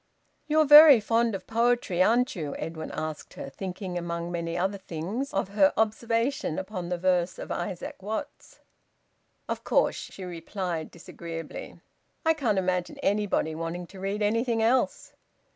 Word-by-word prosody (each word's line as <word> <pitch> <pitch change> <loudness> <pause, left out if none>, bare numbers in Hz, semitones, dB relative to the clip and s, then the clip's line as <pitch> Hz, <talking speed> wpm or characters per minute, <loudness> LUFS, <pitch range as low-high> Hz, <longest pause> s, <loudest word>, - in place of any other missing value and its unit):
"You're 310 0 +4
very 295 -2 +10
fond 230 +1 +1
of 190 - -7
poetry, 230 -5 +1
aren't 240 +6 +3
you?" 150 -5 -4
Edwin 160 0 -5
asked 155 -1 -6
her, 135 - -7
thinking, 185 +1 -5
among 170 0 -4
many 170 -1 -3
other 190 +3 -1
things, 190 - -4
of 195 0 -1
her 200 -1 +4
observation 230 - 0
upon 190 -2 -5
the 180 - -1
verse 180 0 +1
of - - -7
Isaac 175 +1 -5
Watts. 215 +3 -6 0.9
"Of - - -4
course," - - +2
she 190 - -8
replied 175 -1 -4
disagreeably. 165 -1 -8 0.4
"I 320 - +5
can't 245 -10 0
imagine 180 -1 -1
anybody 200 -6 +1
wanting 165 +2 -4
to 190 +2 -13
read 200 +2 -2
anything 230 +2 +1
else." 245 +3 +1
190 Hz, 145 wpm, -27 LUFS, 175-225 Hz, 0.9 s, very